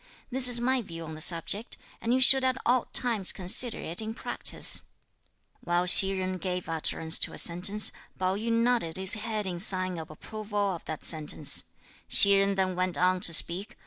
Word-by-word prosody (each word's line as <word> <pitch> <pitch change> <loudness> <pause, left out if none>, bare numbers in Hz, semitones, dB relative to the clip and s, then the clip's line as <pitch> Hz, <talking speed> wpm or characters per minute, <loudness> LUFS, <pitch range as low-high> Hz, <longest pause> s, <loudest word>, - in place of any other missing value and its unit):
This 255 0 +4
is 245 -1 +5
my 255 +1 -1
view 165 -6 -10
on 160 0 -9
the 155 - -10
subject, 180 +7 -1 0.2
and 230 - -3
you 255 - +1
should 265 +1 +5
at 260 0 -1
all 245 0 +1
times 225 -7 0
consider 205 +6 -2
it 170 +6 -6
in 220 +1 -7
practice." - - -2 0.8
While 175 +1 -1
Hsi 195 +2 +5
Jen 185 0 -4
gave 180 -1 -5
utterance 160 0 +1
to - - -3
a - - -10
sentence, 195 +5 +4 0.3
Pao 185 0 -2
yü 225 +3 -4
nodded 230 -7 -1
his 190 0 +4
head 215 -1 -4
in 180 -2 -6
sign 185 -2 +3
of 160 - -10
approval 210 +6 -9 0.2
of 170 - -10
that 155 - -8
sentence. 150 - -1 0.4
Hsi 200 - +7
Jen 195 0 0
then 190 -1 -2
went 185 0 -3
on 185 0 0
to 170 - -1
speak. 175 +5 0
190 Hz, 190 wpm, -26 LUFS, 175-225 Hz, 0.8 s, Hsi